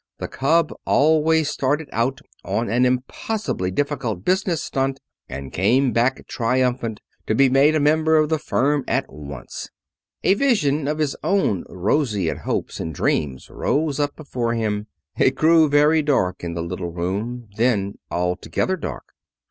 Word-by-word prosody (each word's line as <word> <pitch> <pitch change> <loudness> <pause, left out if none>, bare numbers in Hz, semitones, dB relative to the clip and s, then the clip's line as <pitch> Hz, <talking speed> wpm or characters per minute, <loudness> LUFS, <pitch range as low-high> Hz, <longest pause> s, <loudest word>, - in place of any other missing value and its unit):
The - - -4
cub 165 +5 +1
always 155 +1 +3
started 145 +3 -1
out 125 +4 0 0.2
on 115 +1 -1
an 125 +2 +3
impossibly 130 - -2
difficult 115 -4 -2
business 185 -4 +1
stunt 135 0 -1 0.3
and 65 0 -7
came 125 +8 +3
back 120 +4 +1
triumphant, 120 -2 -1 0.3
to 110 - +1
be 135 +2 +5
made 140 +4 +5
a - - +3
member 155 +2 +3
of 155 -1 +3
the 160 -1 +1
firm 145 0 +1
at - - -1
once. 70 -3 -8 0.5
A - - +5
vision 155 - +1
of 150 +1 -1
his 150 -3 0
own 190 - +1
roseate 100 - 0
hopes - - -3
and 80 -2 -4
dreams 65 -4 -1
rose 150 -1 0
up 145 0 0
before 120 -6 -2
him. 105 -2 -2 0.3
It 130 - +4
grew 160 +1 +5
very 150 +2 +4
dark 130 -14 0
in 85 -1 -4
the 85 - -2
little 90 +1 -4
room, 105 +8 -4
then 105 -4 +1
altogether 90 - -1
dark. - - -7
130 Hz, 150 wpm, -22 LUFS, 105-150 Hz, 0.5 s, be